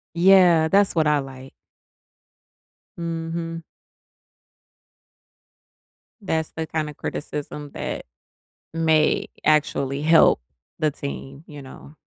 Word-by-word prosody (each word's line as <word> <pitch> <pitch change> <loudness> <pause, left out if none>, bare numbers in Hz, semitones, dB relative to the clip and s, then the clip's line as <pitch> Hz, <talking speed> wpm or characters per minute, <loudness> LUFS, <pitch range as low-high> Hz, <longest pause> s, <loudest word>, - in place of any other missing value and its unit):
Yeah, 175 -3 +5
that's 200 +3 +3
what 160 -2 +2
I 150 -1 +3
like. 135 -1 -9 1.4
Mhm. 165 0 -4 2.6
That's 160 -5 -2
the 160 -1 -5
kind 155 -1 -2
of 150 - -12
criticism 145 0 -6
that - - -5 0.7
may 160 -2 +2 0.2
actually 140 -2 +1
help 160 - +5 0.4
the 155 -2 +1
team, 140 +1 -8
you 145 -2 -10
know? 140 +3 -13
155 Hz, 95 wpm, -23 LUFS, 145-165 Hz, 2.6 s, Yeah